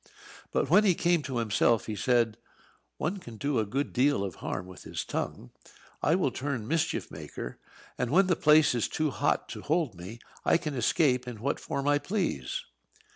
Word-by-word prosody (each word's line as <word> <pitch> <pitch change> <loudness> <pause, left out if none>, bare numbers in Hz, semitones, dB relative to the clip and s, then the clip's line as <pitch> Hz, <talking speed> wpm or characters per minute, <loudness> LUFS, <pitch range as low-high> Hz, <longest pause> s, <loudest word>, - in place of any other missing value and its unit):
But - - +1
when 195 +7 +6
he 190 -4 +4
came 175 -1 +2
to 130 -3 -4
himself 115 0 +2
he 110 - -4
said: 115 -1 +2 0.6
"One 175 +6 -1
can 120 -10 -10
do 140 0 0
a 110 - 0
good 135 +7 -2
deal 130 -4 +3
of 95 -3 -3
harm 90 - -3
with 95 0 -12
his - - -5
tongue. - - -4 0.5
I 160 - +3
will 180 -8 +1
turn 130 -5 -3
mischief 165 +1 -1
maker; - - -7 0.4
and 125 - 0
when 185 +8 +5
the 180 -2 +2
place 150 -1 +5
is 120 -3 0
too 155 -2 -1
hot 145 +3 0
to - - -6
hold 155 - 0
me, 90 +6 -9 0.3
I - - +4
can 155 -3 -4
escape 125 0 +2
in 120 -3 -6
what 140 +6 -1
form 140 0 -3
I 145 0 +4
please." 160 - -2
135 Hz, 190 wpm, -29 LUFS, 115-155 Hz, 0.6 s, when